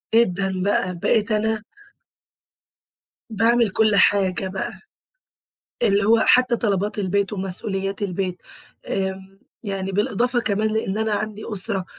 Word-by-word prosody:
جدًا 195 -4 +2
بقى، 185 -2 0
بقيت 215 +3 +1
أنا 215 0 0 1.7
باعمل 230 +1 +2
كل 215 +1 +2
حاجة 190 -1 +3
بقى، 190 +1 -4 1.1
اللي 200 0 +3
هو 225 +2 +4
حتى 250 -1 +4
طلبات 205 -1 -1
البيت، 200 +1 0
ومسؤوليات 195 +1 -3
البيت، 185 -1 -3 0.5
آمم، 190 0 -4 0.2
يعني 195 -2 -3
بالإضافة 240 +4 +1
كمان 215 -2 0
لإن 215 -2 -1
أنا 220 -1 0
عندي 215 0 -4
أُسرة، 195 -1 0
200 Hz, 115 wpm, -22 LUFS, 190-220 Hz, 1.7 s, هو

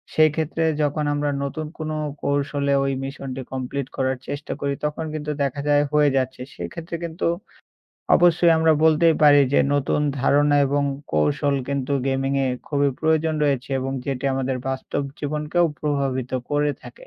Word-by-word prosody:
সেক্ষেত্রে 155 +1 +2 0.2
যখন 150 +1 0
আমরা 145 0 0
নতুন 155 +3 -4
কোনো 155 0 -3 0.3
কৌশলে 140 0 0
ওই 135 0 0
মিশনটি 135 -1 -6
কমপ্লিট 130 +1 -3
করার 130 -1 0
চেষ্টা 145 +1 -5
করি। 140 0 0
তখন 150 +2 -2
কিন্তু 150 -1 -3
দেখা 140 +1 -2
যায় 145 0 +4
হয়ে 150 -1 +5
যাচ্ছে। 130 -1 -2
সেক্ষেত্রে 170 +1 -6
কিন্তু 165 +2 -4 0.9
অবশ্যই 175 -1 +5
আমরা 160 0 +4
বলতেই 160 +1 +5
পারি 145 -1 +7
যে - - +6
নতুন 145 +1 +1 0.2
ধারণা 145 +2 +3
এবং 145 +1 +1 0.3
কৌশল 75 - +1
কিন্তু 140 0 -2 0.2
গেমিং-এ 135 0 0 0.2
খুবই 145 -1 +2
প্রয়োজন 160 0 +2
রয়েছে 135 -3 0
এবং 135 +1 -3
যেটি 135 -1 -3
আমাদের 130 0 -1
বাস্তব 130 +2 -2 0.2
জীবনকেও 150 +4 0 0.2
প্রভাবিত 135 -4 -1 0.2
করে 145 0 +1
থাকে। - - -12
145 Hz, 150 wpm, -23 LUFS, 135-155 Hz, 0.9 s, পারি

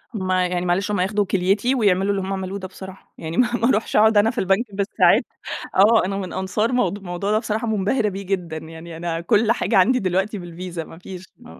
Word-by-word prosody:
هم 190 -3 -2
يعني 180 -1 0
معلش 190 +4 0
هم 205 - 0
ياخدوا 205 +2 +1
كِليتي 195 +7 +1
ويعملوا 200 -4 +2
اللي 195 -1 -1
هم 190 +1 -3
عملوه 190 +1 -4
ده 185 - -6
بصراحة، 190 +1 -12
يعني 160 +1 -6
ما 250 - +4
ما 235 +1 +1
أروحش 220 -3 0
أقعد 220 0 +5
أنا 205 +2 +5
في - - -17
البنك 195 +5 +1
بالساعات 200 +1 +3 0.5
آه، 215 +2 +5
أنا 195 +1 -2
من 185 -2 -5
أنصار 200 +5 -1
موض 205 -5 0
موضوع 175 +2 -3
ده 215 - +3
بصراحة 220 0 -3
منبهرة 210 +1 +1
بيه 195 +1 -6
جدًا، 180 -4 -3
يعني 160 +1 -9
أنا 165 0 -3
كل 215 +6 +2
حاجة 235 - +1
عندي 250 +7 +4
دلوقتي 195 +3 -1
بالVisa 175 0 -8
ما 165 - -13
فيش 185 0 -10
ما 245 - -15
195 Hz, 215 wpm, -22 LUFS, 180-210 Hz, 0.5 s, أقعد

